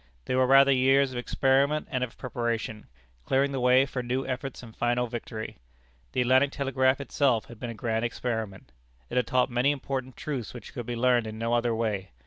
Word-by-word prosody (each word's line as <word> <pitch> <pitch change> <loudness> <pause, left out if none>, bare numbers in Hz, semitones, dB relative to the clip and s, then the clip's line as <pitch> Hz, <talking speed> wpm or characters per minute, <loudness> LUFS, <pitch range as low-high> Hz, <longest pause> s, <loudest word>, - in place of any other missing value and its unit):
They - - -2
were 130 0 +3
rather 135 +1 +7
years 135 +1 +4
of 125 - -4
experiment 135 +4 +1
and 130 -1 0
of 125 - -6
preparation, 115 -3 -3 0.4
clearing 135 - +1
the 135 - -2
way 125 +2 +5
for 135 -2 -4
new 125 +2 -2
efforts 130 0 -5
and 115 -2 -12
final 120 +1 +1
victory. 115 - -6 0.5
The - - +1
Atlantic 130 +3 +4
Telegraph 135 -1 +1
itself 135 -4 +1
had 120 -2 -13
been 120 - -5
a 115 - -6
grand 110 +1 -1
experiment. 110 - -4 0.4
It - - -2
had 125 - +2
taught 125 -1 +2
many 120 +3 +2
important 135 -2 -3
truths 130 -6 -5
which 120 - -10
could 120 -5 -6
be 120 - -2
learned 120 -1 +2
in 110 0 -6
no 115 +1 -1
other 120 -1 +1
way. 105 -4 -2
125 Hz, 200 wpm, -27 LUFS, 115-135 Hz, 0.5 s, rather